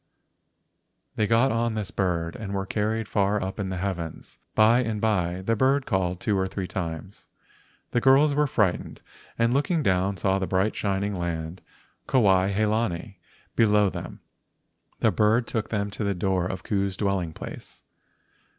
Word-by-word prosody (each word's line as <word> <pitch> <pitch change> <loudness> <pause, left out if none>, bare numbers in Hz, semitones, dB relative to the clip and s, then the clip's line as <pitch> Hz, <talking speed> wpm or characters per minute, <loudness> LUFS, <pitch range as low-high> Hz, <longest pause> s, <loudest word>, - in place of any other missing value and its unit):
They 105 - +1
got 115 +4 +3
on 115 0 0
this, 105 -4 -3
bird 85 -3 -1
and 100 -2 -5
were 95 0 -2
carried 110 +2 -1
far 100 0 +1
up 95 +2 -5
in 95 -2 -2
the 95 - -3
heavens. 90 -4 -5 0.2
By 110 +2 +5
and 110 -4 -1
by 95 -4 0
the 115 +4 +1
bird 135 +4 +2
called 90 -4 -1
two 110 -2 0
or 95 0 +1
three 95 0 -4
times. 90 0 -6 0.6
The 120 - +1
girls 140 +3 +5
were 150 +1 +2
frightened 105 -9 -1 0.3
and 115 +1 +2
looking 155 +4 +1
down 95 0 +1
saw 95 +2 +1
the 95 - -2
bright 95 +4 +1
shining 100 0 -1
land 85 -1 -4 0.5
Kuai 95 -6 +3
he 105 +2 +1
lani 105 -4 -2 0.4
below 105 -3 +4
them. - - -8 0.8
The - - +4
bird 110 +3 +2
took 110 -2 -3
them 100 -2 -2
to 105 - -4
the 100 -1 0
door 90 0 0
of 95 - -5
Ku's 100 -2 -1
dwelling 95 -5 -1
place. - - -9
100 Hz, 165 wpm, -26 LUFS, 95-110 Hz, 0.8 s, By